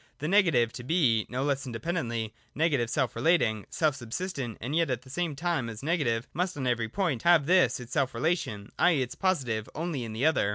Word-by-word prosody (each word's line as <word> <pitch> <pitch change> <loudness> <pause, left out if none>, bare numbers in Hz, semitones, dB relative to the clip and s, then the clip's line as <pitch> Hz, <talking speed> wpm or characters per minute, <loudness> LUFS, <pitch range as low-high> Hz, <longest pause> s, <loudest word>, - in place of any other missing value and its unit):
The 150 - -3
Negative 165 - +4
is - - -23
to 120 - -8
be, 125 -7 +2
no 130 +2 -2
less 140 -1 -1
independently, 115 -3 -3 0.2
negative 140 -7 +1
self 125 +1 0
relating, 120 - +2
self 155 -3 +1
subsistent, 130 - -4
and 135 +6 -3
yet 165 -2 +2
at 125 -1 -2
the 130 - -13
same 170 -1 -2
time 160 -5 -1
as 110 +2 -8
Negative 140 -8 0
must 180 0 -1
on 135 - -3
every 120 -3 0
point 160 - -1
have 170 -4 +5
this 175 -8 +4
its 125 0 -10
self 135 -5 0
relation, 115 - -1
i.e. 165 -7 +4
its 125 - -6
Positive, 130 - -1
only 160 -5 -3
in 110 -2 -6
the 115 +6 -1
other. 160 -10 +3
135 Hz, 210 wpm, -28 LUFS, 115-165 Hz, 0.2 s, have